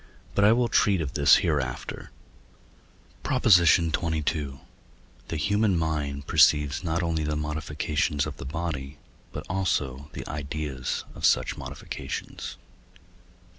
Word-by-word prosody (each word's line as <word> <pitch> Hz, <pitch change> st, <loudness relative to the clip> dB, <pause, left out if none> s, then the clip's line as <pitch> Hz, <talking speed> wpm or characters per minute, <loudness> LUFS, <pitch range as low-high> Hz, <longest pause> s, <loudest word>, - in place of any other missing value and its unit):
But 100 Hz, -, +2 dB
I 105 Hz, -, +7 dB
will 120 Hz, +1 st, +3 dB
treat 100 Hz, -4 st, +3 dB
of 75 Hz, -4 st, -3 dB
this 70 Hz, -, +6 dB
hereafter. 70 Hz, -6 st, -2 dB, 1.1 s
PROP. 130 Hz, -2 st, -2 dB
XXII. 85 Hz, -4 st, +6 dB
The 70 Hz, -5 st, -5 dB
human 100 Hz, +2 st, +2 dB
mind 75 Hz, -3 st, -2 dB
perceives 75 Hz, +1 st, +4 dB
not 85 Hz, 0 st, -1 dB
only 80 Hz, -2 st, -1 dB
the 75 Hz, 0 st, -1 dB
modifications 75 Hz, -1 st, -1 dB
of -, -, -6 dB
the -, -, -8 dB
body, 75 Hz, -2 st, -4 dB, 0.3 s
but -, -, -7 dB
also 75 Hz, -7 st, -1 dB
the -, -, -7 dB
ideas 70 Hz, -3 st, -4 dB
of -, -, -11 dB
such -, -, +3 dB
modifications. 70 Hz, +2 st, -6 dB
75 Hz, 120 wpm, -26 LUFS, 70-85 Hz, 1.1 s, I